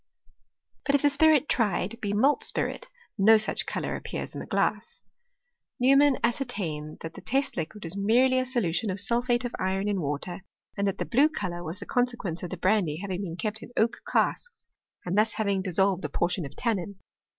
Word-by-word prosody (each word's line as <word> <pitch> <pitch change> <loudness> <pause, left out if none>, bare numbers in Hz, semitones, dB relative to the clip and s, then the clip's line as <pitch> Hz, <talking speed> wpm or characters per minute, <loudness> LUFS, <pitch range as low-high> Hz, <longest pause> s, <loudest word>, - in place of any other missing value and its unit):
But 280 - +2
if 285 - +1
the 290 - +6
spirit 305 0 +4
tried 220 0 0
be 205 -3 -1
malt 260 +8 +3
spirit, - - -2 0.3
no 220 +3 +7
such 215 - 0
colour - - -2
appears - - -5
in - - -6
the - - -7
glass. - - -1 0.8
Neumann 275 +2 +5
ascertained 195 - -2
that 165 0 -6
the - - -10
test 270 +3 0
liquid 185 +5 -5
was 165 +2 -4
merely 245 +6 +3
a 255 - 0
solution 225 -5 0
of 190 +1 -2
sulphate 240 +4 +1
of 245 - -4
iron 190 +2 0
n 200 -3 0
water, 150 +6 -3 0.3
and 200 0 0
that 195 - -1
the - - -2
blue 275 +6 +4
colour 175 - -4
was 165 +3 -5
the 200 - -8
consequence 240 -9 -1
of 180 - -5
the - - -5
brandy 185 -6 +1
having 190 0 -4
been 170 -4 -5
kept 215 +2 -3
in - - -10
oak 230 +1 +1
casks, 485 -2 0 0.4
and 180 +1 -1
that 220 +1 +2
having 200 -3 0
dissolved 190 0 +1
a - - -2
portion 175 -3 -1
of 140 - -16
tannin. 200 -5 -2
205 Hz, 195 wpm, -27 LUFS, 185-245 Hz, 0.8 s, no